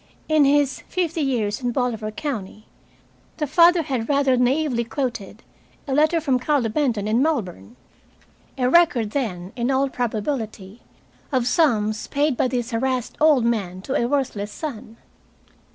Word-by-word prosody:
In 310 -2 +4
his 280 -1 +2
"Fifty 335 -3 -1
Years 230 -6 -1
in 245 -1 -1
Bolivar 235 -4 -2
County," 215 -5 -6 0.7
the 300 - -1
father 340 +3 +5
had 255 -6 -3
rather 280 -2 +3
naively 250 0 +1
quoted 235 -4 -5 0.4
a 270 - -2
letter 310 +4 +3
from 270 -5 +1
Carlo 255 -3 +1
Benton 225 -5 0
in 225 +4 +2
Melbourne. 240 - -2 0.8
A 250 -1 +1
record, 260 -8 +3
then, 195 -8 -3
in 240 +1 -1
all 270 +1 +1
probability, 220 -4 -4 0.5
of 255 -3 +1
sums 220 -6 +1
paid 285 -1 0
by 255 - +1
this 245 -1 -3
harassed 250 +1 -1
old 300 -6 +5
man 200 -6 -1
to 265 - -4
a 240 -4 +1
worthless 240 -7 -2
son. 230 -5 -7
250 Hz, 145 wpm, -22 LUFS, 225-290 Hz, 0.8 s, father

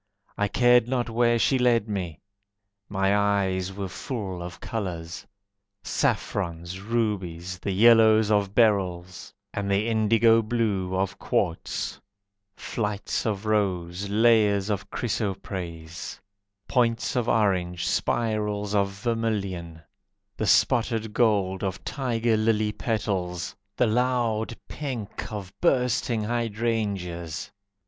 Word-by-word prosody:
I 105 - +1
cared 120 +2 +4
not 120 -2 -1
where 120 +1 +3
she 130 +3 +2
led 120 -3 +3
me, 90 -7 -4 0.7
My 95 0 +2
eyes 95 -2 +1
were 95 0 -4
full 95 -4 -5
of 85 0 -7
colours: 90 -4 -5 0.6
Saffrons, 85 -1 -1
rubies, 95 -6 -2
the 100 - -3
yellows 110 +1 +6
of 100 -1 +1
beryls, 95 -6 +1 0.2
And 100 -1 -2
the 100 +3 +1
indigo 115 +1 +4
blue 105 -5 -1
of 95 0 -1
quartz; 85 - -2 0.5
Flights 105 0 -2
of 105 -1 -2
rose, 95 -3 0
layers 105 -2 +3
of 100 -1 -3
chrysoprase, 95 -7 -4 0.5
Points 120 -2 +1
of 120 -2 0
orange, 90 -5 +1
spirals 105 -2 0
of 100 -1 +2
vermilion, 100 -6 -3 0.5
The - - -2
spotted 110 -2 +2
gold 105 -5 +2
of 95 -1 -3
tiger 120 -4 0
lily 110 -1 +2
petals, 95 -6 -2 0.2
The 125 - +3
loud 115 -1 0
pink 120 -10 -5
of 100 -3 -6
bursting 125 -7 +2
hydrangeas. 105 -8 -2
105 Hz, 110 wpm, -26 LUFS, 95-115 Hz, 0.7 s, yellows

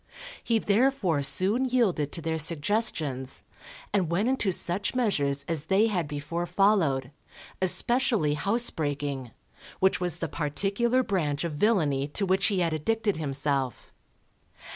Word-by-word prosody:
He 230 - +2
therefore 210 - +1
soon 190 - +3
yielded 210 - +1
to 165 - -5
their 160 0 -1
suggestions, 155 - 0 0.5
and 190 -5 +1
went 195 +8 +1
into 260 -7 +1
such 185 +6 0
measures 145 - 0
as 160 -3 -2
they 195 +6 +3
had 175 -7 -1
before 150 +4 -4
followed, 175 -9 +2 0.5
especially 210 - +1
housebreaking, 145 - -2 0.5
which 190 -1 +2
was 180 -1 +1
the - - -3
particular 200 - 0
branch 155 - -1
of 170 - -2
villainy 145 -7 +1
to 200 - +1
which 190 +1 +2
he 195 -3 0
had 165 -2 0
addicted 210 +5 -1
himself. 140 -3 -2
175 Hz, 130 wpm, -27 LUFS, 145-210 Hz, 0.5 s, soon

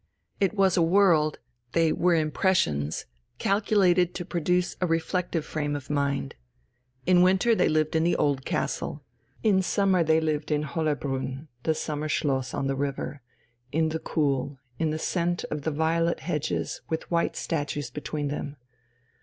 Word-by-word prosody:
It 195 +1 +1
was 190 -3 +3
a - - +4
world, 165 -4 +4 0.4
they 165 -2 +3
were 175 0 +3
impressions, 155 - +1 0.3
calculated 190 -3 +2
to 175 - -4
produce 180 +2 0
a 180 - +2
reflective 165 0 -1
frame 145 -1 -2
of 140 0 -6
mind. 140 - -1 0.7
In 180 0 +5
winter 190 +5 +4
they - - +3
lived 155 0 +1
in 160 - +3
the 175 - +2
old 140 -2 +1
castle. 145 +2 -2 0.4
In 200 -4 +4
summer 190 -2 +2
they 160 0 +3
lived 155 -1 -1
in 150 -1 +1
Hollerbrunn, 145 -2 -2
the 160 +4 +1
summer 155 0 -3
schloss, 135 -4 0
on - - -2
the 135 0 0
river, 140 +1 -3 0.5
in 160 +1 +2
the 160 +1 -2
cool, 140 -3 -1 0.2
in 160 -1 +1
the 155 - -1
scent 175 +1 -1
of 150 - -2
the 160 - -1
violet 165 +2 +1
hedges 155 -3 -2
with 160 +2 -3
white 170 0 +1
statues 145 -4 -3
between 145 +1 -3
them. 145 0 -4
160 Hz, 155 wpm, -27 LUFS, 145-175 Hz, 0.7 s, In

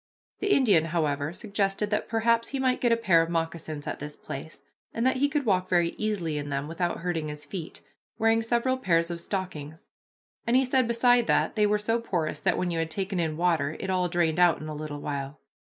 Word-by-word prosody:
The 405 0 0
Indian, 210 - +4
however, 155 -3 -1
suggested 200 +1 -2
that 210 - -1
perhaps 230 +1 +2
he 275 - -3
might 255 -1 +1
get 240 - +3
a 230 - +4
pair 185 -8 +4
of 165 - -1
moccasins 165 -3 -3
at 150 - -4
this 150 +1 -7
place, 155 +3 -8 0.3
and 230 - 0
that 260 0 +3
he 285 +2 +2
could 285 -1 -1
walk 185 -4 +1
very 175 -2 +3
easily 180 -9 -2
in 145 0 -5
them 140 +1 -2
without 170 +1 -2
hurting 170 -3 -2
his 150 0 -7
feet, 175 -5 -7 0.4
wearing 225 0 +3
several 240 +3 +1
pairs 170 -6 +2
of 170 -1 -4
stockings, 160 -6 -5 0.6
and 235 - +3
he 265 +1 +4
said 255 -1 +2
beside 240 0 +3
that - - +2
they 210 -1 +3
were 210 0 +2
so 225 +3 0
porous 170 -8 -2
that - - +1
when 180 -1 -1
you 165 - -1
had 165 0 -1
taken 190 +2 -2
in 160 -2 -1
water 160 -4 +1
it 190 - -3
all 180 -1 +1
drained 170 -1 +1
out 175 -2 +5
in 155 - -7
a 155 - -5
little 150 -1 -6
while. 140 0 -4
180 Hz, 220 wpm, -27 LUFS, 160-225 Hz, 0.6 s, out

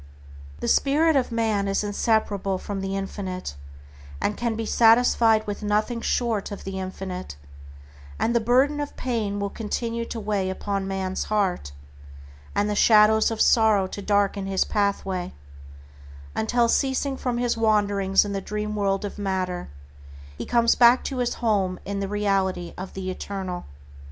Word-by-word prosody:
The - - -2
spirit 310 +3 +3
of 260 -3 +1
man 220 -3 0
is 195 +1 0
inseparable 205 -2 0
from 195 +1 -5
the 195 0 -2
Infinite, 190 - -5 0.6
and 210 - -1
can 235 -2 -2
be 225 0 -3
satisfied 225 -1 +4
with 205 0 -5
nothing 215 +3 0
short 230 -5 -1
of 200 - -8
the 190 0 -5
Infinite, 185 - -6 0.8
and 235 - 0
the - - +5
burden 260 +6 +2
of 290 -1 -5
pain 220 -5 -2
will 200 0 -2
continue 230 +1 -3
to 230 - -6
weigh 205 -3 -1
upon 195 +1 -3
man's 190 -1 -2
heart, 190 - -1 0.8
and 205 - +1
the 210 - -1
shadows 215 +1 +5
of 225 -1 -4
sorrow 220 -5 +4
to 195 +2 -7
darken 200 -1 +1
his 190 -1 +1
pathway 195 -3 -1 1.0
until, 235 +2 +2
ceasing 270 +2 0
from 250 -2 -2
his 240 0 0
wanderings 205 -3 +2
in 205 - -4
the 195 - -2
dream 210 +1 -4
world 200 -1 0
of 205 - -7
matter, 185 - -2 0.7
he - - -6
comes 235 -1 +3
back 240 +1 +5
to 270 - -4
his 245 -1 -1
home 195 -6 0
in 200 0 -3
the 195 - -2
reality 195 -3 -1
of 190 +1 -8
the 185 -1 -3
Eternal. 185 -1 -5
205 Hz, 155 wpm, -24 LUFS, 195-230 Hz, 1.0 s, the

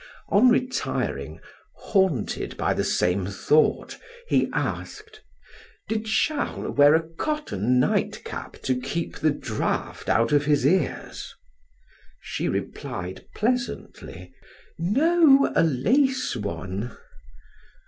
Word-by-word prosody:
On 225 +6 +5
retiring, 255 +1 -1 0.4
haunted 190 - 0
by - - +1
the - - -1
same 90 +1 +1
thought, 150 +10 +1 0.3
he - - +2
asked: 430 +1 -5 0.7
"Did 220 0 -2
Charles 285 +7 -1
wear 145 +2 +7
a 160 0 0
cotton 165 - -1
nightcap - - -2
to 130 -1 0
keep 170 +5 -4
the 155 - +3
draft 125 -7 -3
out 115 +1 +2
of 145 0 +3
his 145 -3 +2
ears?" 165 -1 -1 0.8
She - - -3
replied 90 +1 -5
pleasantly: 245 +3 -3 0.5
"No, 275 - +4
a - - +5
lace 255 - +2
one!" 100 +1 -5
165 Hz, 100 wpm, -25 LUFS, -, 0.8 s, wear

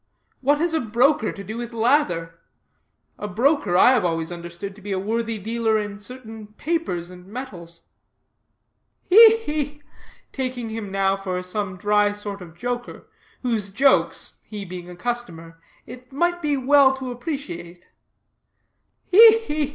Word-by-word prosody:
What 285 +2 +2
has 335 +2 0
a 320 - +2
broker 240 +2 +2
to 200 - -9
do 215 +4 -6
with 240 0 -6
lather? 200 - +1 0.8
A 210 - -4
broker 225 - +1
I 245 - +7
have 250 -6 +2
always 165 -1 -1
understood 175 +3 -7
to 210 - -15
be 205 +1 -6
a 190 - 0
worthy 225 +3 -2
dealer 225 +1 0
in 205 -1 -4
certain 225 -1 -9
papers 265 - -2
and 180 0 -13
metals." 180 -8 -8 1.2
"He, 445 +4 +8
he!" 295 -7 -4 0.5
taking 255 -3 -4
him 220 -2 -5
now 195 0 +1
for 185 -2 -4
some 185 0 -4
dry 205 +1 +2
sort 205 -1 -6
of 170 -2 -12
joker, 245 +3 -5 0.3
whose 225 -5 -1
jokes, 270 +7 +1
he 210 -2 -7
being 180 -1 -8
a 180 - -9
customer, 170 -7 -5 0.2
it 250 +1 -12
might 345 +5 0
be 300 -2 0
as 270 -2 -2
well 275 -1 +6
to 260 -1 -6
appreciate, 240 - -6 1.2
"he, 445 +4 +8
he! 305 -10 -2
220 Hz, 150 wpm, -23 LUFS, 185-270 Hz, 1.2 s, He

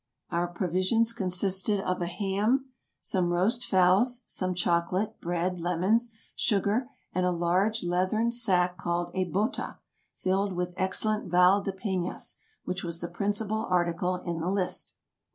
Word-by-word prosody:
Our 170 +1 +1
provisions 185 +6 +1
consisted 190 0 +1
of 185 -2 -2
a 175 - 0
ham, 210 +8 0 0.3
some 180 -3 0
roast 205 +8 +1
fowls, 200 +6 +3
some 185 -1 -2
chocolate, 175 +3 0
bread, 175 +1 -1
lemons, 185 +8 +1 0.2
sugar, 215 +4 +1 0.2
and 185 - +1
a 180 - +3
large 180 +6 +1
leathern 185 +6 +1
sack 180 -7 +2
called 175 -2 -2
a 185 0 0
bota, 200 - -2 0.4
filled 195 +1 0
with 180 0 -2
excellent 210 +2 0
Val 180 +3 +5
de 195 - -2
Penas, 190 -2 -3 0.3
which 180 0 -3
was 170 -1 -3
the 170 - -4
principal 205 +4 -1
article 180 0 +1
in 170 -2 -4
the 165 +3 -1
list. 190 -2 -1
185 Hz, 140 wpm, -28 LUFS, 175-205 Hz, 0.4 s, Val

